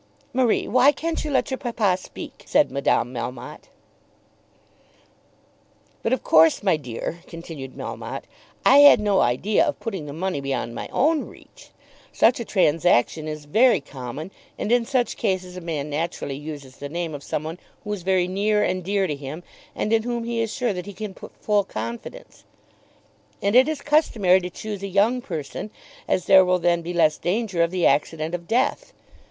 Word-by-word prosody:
"Marie, 250 -3 +2
why 255 +3 +5
can't 330 +2 -3
you 305 - -3
let 270 -1 0
your 265 - -2
papa 225 -7 +1
speak?" 185 - -10
said 295 - +3
Madame 130 -3 +1
Melmotte. 120 +1 -7 2.3
"But 225 - -1
of 260 - 0
course, 160 +2 +5
my 190 -5 +3
dear," 140 +3 -5
continued 165 -6 -9
Melmotte, - - -6 0.4
"I 280 - +7
had 285 -4 +9
no 205 -2 +2
idea 130 - +2
of 295 - -2
putting 190 -10 -5
the - - -6
money 175 -2 -2
beyond 135 -4 -3
my - - -5
own 305 +3 +1
reach. - - -17 0.4
Such 240 +2 +3
a 235 - -4
transaction 160 - +2
is 155 -1 -6
very 235 - +4
common; 140 +4 -8 0.3
and 215 - -3
in 240 -1 +3
such 255 -3 0
cases 185 -4 -2
a 180 - -7
man 150 -3 -4
naturally 150 -2 -3
uses 145 -2 -9
the 145 - -7
name 170 0 -3
of 145 - -6
some 145 - -3
one 160 +3 -6 0.2
who 210 - -3
is 200 - -5
very 185 0 +1
near 210 +3 +1
and 185 0 -1
dear 195 +1 +1
to 150 -5 -2
him, 140 +4 -8 0.3
and 215 - -1
in 225 - +4
whom 240 0 -3
he 230 0 -2
is 225 -1 -2
sure 240 -1 -1
that 180 +1 -6
he 205 - -7
can 205 +1 -6
put - - -13
full 210 -1 +1
confidence. 115 - -7 1.0
And 200 +3 0
it 260 +2 +7
is 310 -2 -3
customary 220 - +3
to 180 -1 -5
choose 205 +2 -6
a 200 - -4
young 210 +6 +2
person, 160 - -6 0.4
as 185 - 0
there 190 -1 +7
will 180 0 +2
then 170 -1 +1
be 170 +1 -5
less 160 -3 +2
danger 190 -1 -1
of 170 - +3
the 180 -1 0
accident 155 +3 +1
of 170 -1 -5
death. 260 - 0
185 Hz, 185 wpm, -23 LUFS, 155-225 Hz, 2.3 s, had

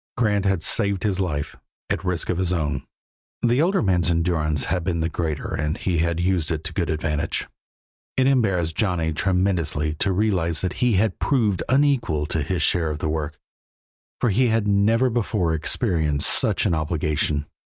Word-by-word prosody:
Grant 105 -4 +1
had 95 -4 +1
saved 100 -4 0
his 100 -3 0
life, 80 -6 -2 0.4
at - - -1
risk 90 -2 -1
of 90 - -2
his 90 -1 +1
own; 75 -6 -2 0.6
the 120 +3 +3
older 185 0 +2
man's 90 -4 +2
endurance 80 -3 +1
had 90 -2 -1
been 85 -1 -1
the 80 - 0
greater 80 -3 -3
and 75 +1 -1
he 90 -3 -1
had 85 0 0
used 90 -3 0
it 80 -1 -2
to 90 - -4
good 85 -1 -1
advantage. 75 -1 -1 0.7
It 130 - +3
embarrassed 95 - +1
Johnny 90 -6 0
tremendously 85 -3 0
to 100 - +1
realize 90 -5 0
that 95 -2 -2
he 125 -2 +3
had 105 +3 +1
proved 110 -10 +1
unequal 130 - +2
to 80 +1 -1
his 85 +5 -1
share 85 -3 +2
of 75 - -3
the 75 +1 -2
work, 75 -1 -3 0.8
for 120 - +2
he 125 +6 +3
had 110 -2 +1
never 110 +5 +3
before 105 -7 0
experienced 75 -2 0
such - - +1
an - - +2
obligation. 75 -2 -1
90 Hz, 175 wpm, -23 LUFS, 80-100 Hz, 0.8 s, the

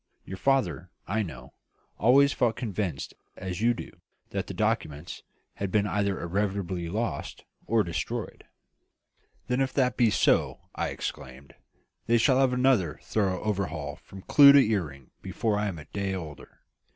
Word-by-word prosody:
Your 95 - -7
father, 100 -10 +1 0.2
I 110 +3 0
know, 65 - -8 0.5
always 140 +6 +5
felt 120 -3 +1
convinced, 100 - -3 0.2
as 95 +1 -5
you 120 +1 +3
do, - - -8 0.4
that - - -3
the - - -6
documents 75 +3 -2 0.3
had 100 - -4
been 105 +1 +2
either 100 -2 0
irretrievably 95 -2 -2
lost, 115 +6 -4 0.2
or 110 -1 +3
destroyed." 85 -3 -4 1.0
"Then 125 +2 0
if 135 0 0
that 130 -3 +1
be 120 -3 +4
so," 105 - +2
I - - -2
exclaimed, 65 +2 -7 0.5
"they 120 - +4
shall 125 +3 +3
have 135 -1 +3
another 125 - +2
thorough 95 -4 -1
overhaul 90 -9 -3
from 95 -1 -13
clew 140 -1 +8
to 140 - +8
earring 75 - -3
before 110 -2 -1
I 105 - 0
am 95 -4 -4
a 75 - -10
day 100 +2 -3
older. 80 -5 -9
100 Hz, 150 wpm, -27 LUFS, 85-115 Hz, 1.0 s, clew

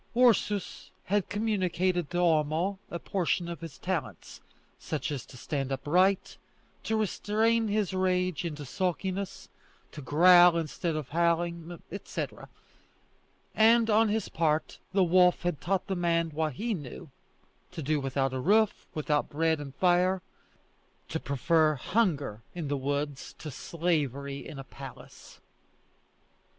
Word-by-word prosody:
Ursus 220 -5 +2
had 205 0 0
communicated 185 -5 0
to 175 - -3
Homo 170 +3 +1
a 170 - -4
portion 175 -1 -1
of 170 -1 -6
his 165 -3 -8
talents: 150 - -4 0.4
such - - -3
as 135 -5 -5
to 130 - -13
stand 135 +1 -3
upright, 180 +8 +1 0.5
to 220 - 0
restrain 220 +2 +1
his 205 -2 0
rage 185 -2 0
into 150 -4 -5
sulkiness, 185 +4 -3 0.4
to 150 - -8
growl 175 +5 +6
instead 165 +1 -2
of 150 -4 -4
howling, 170 +1 0
etc.; 200 - -6 1.0
and 225 +1 +5
on 220 +1 +4
his 220 +1 -1
part, 155 -1 0
the 190 0 +3
wolf 180 +1 +4
had 175 -4 -1
taught 190 +1 0
the 190 - -2
man 170 -2 +1
what 155 -1 -1
he 225 - -2
knew 145 -3 -8 0.6
to 170 -4 -6
do 150 +2 +1
without 135 -1 -1
a 130 - -2
roof, 210 +8 +2
without 150 -1 0
bread 160 +1 +1
and 140 -2 -8
fire, 180 +1 +2 0.9
to - - -2
prefer 155 +4 +2
hunger 145 - 0
in 165 -5 -4
the 145 - 0
woods 140 +1 -3
to 155 - -7
slavery 140 -4 -2
in 155 - -8
a 135 - -6
palace. 135 -1 -12
170 Hz, 135 wpm, -29 LUFS, 150-190 Hz, 1.0 s, growl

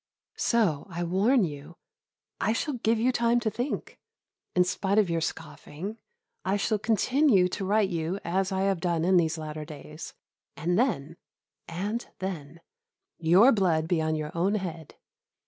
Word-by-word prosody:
So, 205 - +1
I 175 -1 -3
warn 200 +8 +3
you. 150 0 -6 0.6
I 220 - +1
shall 285 +5 -2
give 230 -2 +1
you 240 +4 +2
time 235 -1 +2
to 220 -2 0
think; 245 +6 -4 0.6
in 180 - +5
spite 190 +2 -1
of 200 -5 +3
your 165 0 0
scoffing, 165 +6 -6 0.4
I 195 +2 +1
shall 210 +1 0
continue 230 -1 +3
to 195 - -4
write 205 0 +2
to - - -2
you 165 +4 -2
as 190 +3 0
I 190 0 0
have 195 -2 +1
done 170 -1 0
in 185 0 +4
these 160 -2 +2
latter 155 -1 -5
days; 150 +1 -9 0.4
and 170 +3 0
then 175 - 0 0.5
and 205 +8 -3
then 165 -4 -6 0.6
your 180 +10 +6
blood 170 -8 +2
be 170 -2 +1
on 155 0 0
your 155 0 -4
own 185 +5 +1
head. 165 -6 -5
185 Hz, 165 wpm, -27 LUFS, 160-215 Hz, 0.6 s, your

